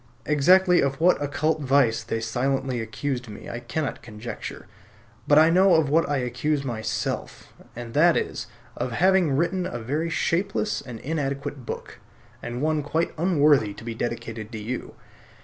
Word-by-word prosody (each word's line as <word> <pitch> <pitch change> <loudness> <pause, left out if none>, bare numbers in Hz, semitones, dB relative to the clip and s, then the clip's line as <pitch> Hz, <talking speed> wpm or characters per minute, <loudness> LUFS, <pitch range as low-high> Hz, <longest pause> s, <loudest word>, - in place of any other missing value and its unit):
Exactly 180 +5 +5
of 135 0 -1
what 175 -1 +4
occult 145 +2 0
vice 130 -4 +3
they 115 0 -3
silently 125 +2 -1
accused 125 +3 -4
me 105 - -9
I 120 - -5
cannot 150 +3 -3
conjecture, 115 0 -8 0.6
but 145 - +5
I 160 +2 +7
know 185 +1 +5
of 160 -3 +2
what 165 0 +3
I 145 - +1
accuse 135 +4 -1
myself; 110 -4 -4 0.2
and 120 -1 -7
that 165 +3 +5
is, - - -3 0.3
of 125 - -3
having 180 -2 +3
written 180 +3 0
a - - -5
very 145 +8 -2
shapeless 195 +6 0
and 125 -4 -9
inadequate 140 -3 -3
book, - - -7 0.4
and 120 +3 -4
one 155 -1 +1
quite 160 +4 -1
unworthy 150 - +3
to - - -11
be 115 0 -4
dedicated 115 -1 -5
to - - -4
you. 120 +4 -5
140 Hz, 160 wpm, -25 LUFS, 120-160 Hz, 0.6 s, I